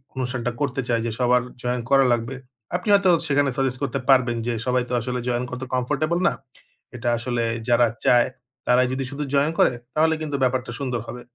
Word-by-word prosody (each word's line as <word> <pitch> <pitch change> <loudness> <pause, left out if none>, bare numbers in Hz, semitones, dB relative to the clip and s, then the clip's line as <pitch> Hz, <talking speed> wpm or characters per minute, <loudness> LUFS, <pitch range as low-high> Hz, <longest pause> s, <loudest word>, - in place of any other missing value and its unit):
অনুষ্ঠানটা 125 -2 -2
করতে 140 -2 0
চায় 115 -1 +2
যে 115 - -1
সবার 125 0 +3 0.2
জয়েন 125 0 -1
করা 135 -1 +5
লাগবে। 120 +2 -2 0.4
আপনি 180 +4 -2
হয়তো 200 -2 +5 0.2
সেখানে 145 -1 +2
সাজেস্ট 130 -2 0
করতে 140 - -1
পারবেন 125 -3 +4
যে 120 - 0
সবাই 125 -1 +1
তো - - -3
আসলে 125 +2 -3
জয়েন 120 0 0
করতে 125 +1 -5
কমফোর্টেবল 150 +7 0
না। - - +2 0.6
এটা 120 0 -2
আসলে 120 0 -2 0.3
যারা 120 0 +5 0.2
চায় 120 -1 +5 0.4
তারাই 125 +1 +4
যদি 135 +1 -2
শুধু 145 +1 -4
জয়েন 140 +2 +3
করে - - +5 0.2
তাহলে 160 +1 +3
কিন্তু 150 -2 -3
ব্যাপারটা 130 0 0
সুন্দর 125 -4 -2
হবে। 125 - -7
125 Hz, 190 wpm, -23 LUFS, 120-140 Hz, 0.6 s, করা